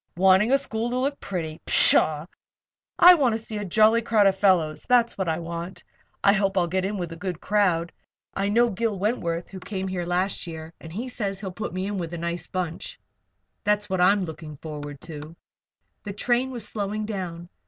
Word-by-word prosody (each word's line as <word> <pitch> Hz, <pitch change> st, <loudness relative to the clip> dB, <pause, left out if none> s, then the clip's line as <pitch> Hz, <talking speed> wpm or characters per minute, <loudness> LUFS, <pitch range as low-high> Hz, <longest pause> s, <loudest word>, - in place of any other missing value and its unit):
"Wanting 190 Hz, +5 st, +4 dB
a 275 Hz, -, +6 dB
school 230 Hz, -3 st, -1 dB
to 250 Hz, -, -2 dB
look 275 Hz, +2 st, -1 dB
pretty! 160 Hz, -4 st, -5 dB
Pshaw! 155 Hz, 0 st, +5 dB, 0.7 s
I 360 Hz, +1 st, +9 dB
want 265 Hz, -9 st, +2 dB
to -, -, 0 dB
see 220 Hz, -1 st, -5 dB
a -, -, -4 dB
jolly 215 Hz, +4 st, +4 dB
crowd 220 Hz, -3 st, +3 dB
of 195 Hz, -1 st, +4 dB
fellows, 180 Hz, -6 st, +2 dB
that's 240 Hz, -2 st, +3 dB
what 190 Hz, -2 st, -2 dB
I 160 Hz, -, 0 dB
want. 170 Hz, +2 st, -6 dB, 0.4 s
I 200 Hz, -, +6 dB
hope 195 Hz, -1 st, 0 dB
I'll 180 Hz, -, +3 dB
get 185 Hz, +2 st, -1 dB
in 205 Hz, +1 st, -2 dB
with 175 Hz, -3 st, -4 dB
a -, -, -6 dB
good 180 Hz, -1 st, -5 dB
crowd. 180 Hz, -6 st, +1 dB, 0.4 s
I 195 Hz, +1 st, -1 dB
know 235 Hz, +3 st, +3 dB
Gil 210 Hz, +1 st, -1 dB
Wentworth, 180 Hz, -5 st, -2 dB
who 190 Hz, -, -8 dB
came 190 Hz, 0 st, -5 dB
here 185 Hz, -2 st, -3 dB
last 180 Hz, +1 st, -1 dB
year, 160 Hz, 0 st, -8 dB
and 160 Hz, -, -10 dB
he 225 Hz, +9 st, -5 dB
says 200 Hz, -6 st, -3 dB
he'll 195 Hz, -2 st, -5 dB
put 195 Hz, +4 st, -5 dB
me 185 Hz, +2 st, -3 dB
in 200 Hz, -1 st, -3 dB
with 170 Hz, -1 st, -4 dB
a -, -, -5 dB
nice 170 Hz, +1 st, -4 dB
bunch. 180 Hz, -3 st, -5 dB, 0.6 s
That's 210 Hz, -1 st, 0 dB
what 190 Hz, -1 st, +1 dB
I'm 195 Hz, +3 st, +4 dB
looking 160 Hz, -3 st, -7 dB
forward 145 Hz, -2 st, -7 dB
to." 155 Hz, -1 st, -9 dB, 0.7 s
The 200 Hz, -, -6 dB
train 240 Hz, +5 st, 0 dB
was 240 Hz, -5 st, -6 dB
slowing 210 Hz, 0 st, -3 dB
down. 180 Hz, -5 st, -5 dB
190 Hz, 205 wpm, -25 LUFS, 170-215 Hz, 0.7 s, I